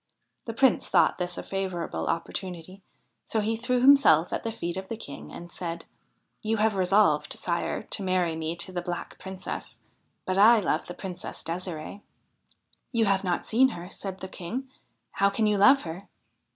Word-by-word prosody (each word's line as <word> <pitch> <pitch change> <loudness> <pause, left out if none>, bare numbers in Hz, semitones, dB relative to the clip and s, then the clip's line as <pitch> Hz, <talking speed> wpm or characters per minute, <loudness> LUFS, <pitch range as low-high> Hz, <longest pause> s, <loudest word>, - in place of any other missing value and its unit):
The 230 - -4
Prince 265 -1 +3
thought - - +4
this 180 -1 -3
a - - -4
favourable 190 -3 -3
opportunity, 180 +2 -4 0.5
so 220 - 0
he 220 +2 0
threw 245 +2 0
himself 255 - +6
at - - -1
the 225 - -3
feet 175 -6 -4
of 190 0 -5
the 225 - -5
King 145 -10 -9
and 175 0 -9
said: 170 -2 -5 0.3
' - - -47
You 220 0 0
have 215 0 +3
resolved, 195 +2 +3
sire, - - -2
to - - -3
marry 185 -3 +1
me 160 +1 -3
to 170 +2 -3
the 180 -1 -3
Black 175 0 -5
Princess, 190 0 -7 0.5
but 185 +1 0
I 225 +3 +8
love 195 - -1
the 175 - -7
Princess 180 -2 -7
Ddsiree.' 175 +2 -5 0.5
' - - -38
You 230 -3 +2
have 195 -1 +2
not 180 -2 -1
seen 255 +4 +4
her,' 180 -4 -8
said 190 -1 -6
the 190 - -4
King. 235 +9 -6 0.2
' - - -48
How 200 0 +5
can 215 +2 0
you 210 -1 +2
love 270 +7 +6
her?' 175 +4 -7
190 Hz, 190 wpm, -27 LUFS, 175-220 Hz, 0.5 s, I